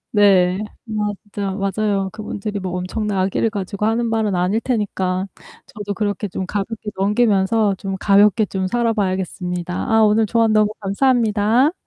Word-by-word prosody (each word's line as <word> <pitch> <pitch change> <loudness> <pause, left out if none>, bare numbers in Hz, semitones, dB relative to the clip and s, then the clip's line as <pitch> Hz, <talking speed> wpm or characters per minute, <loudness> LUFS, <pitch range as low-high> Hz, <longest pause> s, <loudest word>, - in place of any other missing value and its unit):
네. 190 -4 +4 0.3
맞아 205 -2 -3
맞아요. 195 0 -1
그분들이 210 -1 -5
뭐 185 -1 -4
엄청난 200 +2 -2
악의를 190 +4 +1
가지고 200 -1 -4
하는 230 +2 +1
말은 220 -3 0
아닐 180 +5 +1
테니까 190 -5 -1 0.4
저도 210 -6 -6
그렇게 205 0 -2
좀 185 0 -4
가볍게 210 +2 -4
넘기면서 205 0 +2
좀 195 -1 -4
가볍게 205 +1 +4
좀 190 -1 -2
살아 235 +3 +1
봐야겠습니다. 180 -3 -2 0.2
아 220 - +5
오늘 215 +1 +3
조언 225 0 +2
너무 215 0 +3
감사합니다. 225 +4 +2
205 Hz, 340 characters per minute, -20 LUFS, 190-220 Hz, 0.4 s, 아